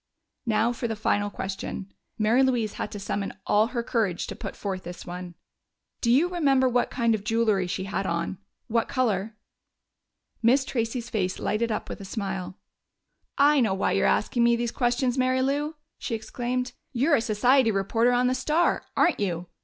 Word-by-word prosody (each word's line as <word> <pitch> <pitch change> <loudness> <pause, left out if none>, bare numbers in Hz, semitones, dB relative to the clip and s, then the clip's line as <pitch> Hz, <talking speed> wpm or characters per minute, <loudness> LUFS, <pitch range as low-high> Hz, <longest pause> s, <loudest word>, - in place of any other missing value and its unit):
Now 225 +2 +2
for 235 0 -3
the 225 - -2
final 205 -1 0
question! 195 0 -5 0.2
Mary 225 +4 +3
Louise 245 -5 +1
had 210 - -3
to 205 - -5
summon 200 0 -3
all 215 +2 +3
her 240 -1 -3
courage 220 -8 0
to - - -6
put - - -6
forth 190 -2 -4
this 175 0 -8
one. 180 -1 -7 0.7
"Do 235 - +1
you 275 +9 +5
remember 280 -7 +2
what 245 0 +1
kind 235 -2 +1
of 210 -2 -2
jewelry 215 -4 +1
she 190 +1 -3
had 195 0 -2
on? 170 +2 -2 0.3
What 230 0 0
color?" 220 -4 -1 1.0
Miss 260 +4 +4
Tracey's 235 -1 -3
face 185 -4 -1
lighted 230 +2 -1
up 215 - -3
with - - -7
a - - -7
smile. 190 -2 -4 0.8
"I 290 +1 +5
know 220 -6 +2
why 195 - 0
you're - - +2
asking 240 - +2
me 235 0 +5
these 235 0 -1
questions, 245 0 0
Mary 255 0 +2
Lou!" 290 +3 -1 0.2
she 230 - -2
exclaimed. 245 +2 -3 0.2
"You're 280 +5 +3
a - - 0
society 240 +3 +3
reporter 225 +4 +2
on 245 0 +2
the 250 - +2
Star 305 +6 +1
aren't 340 - +3
you? 175 -3 -2
230 Hz, 180 wpm, -26 LUFS, 200-255 Hz, 1.0 s, you